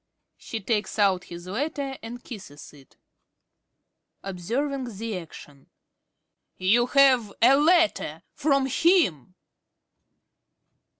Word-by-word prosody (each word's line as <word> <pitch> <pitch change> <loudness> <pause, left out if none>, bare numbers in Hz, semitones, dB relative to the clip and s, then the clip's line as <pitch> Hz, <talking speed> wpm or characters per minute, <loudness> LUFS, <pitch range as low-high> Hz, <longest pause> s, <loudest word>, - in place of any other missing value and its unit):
(She 225 - -6
takes 210 +1 -2
out 195 -3 +2
his 170 0 -10
letter 270 +7 -3
and 240 +2 -9
kisses 185 - -11
it.) 140 -3 -19 1.3
~Carey~ 195 - -5
(observing 245 +5 -3
the 225 0 -4
action). 145 -4 -14 0.9
You 225 +6 +3
have 255 -6 +4
a 250 +4 +6
letter 330 +3 +2
from 275 -2 +1
him! 270 - +1
230 Hz, 100 wpm, -25 LUFS, 185-275 Hz, 1.3 s, a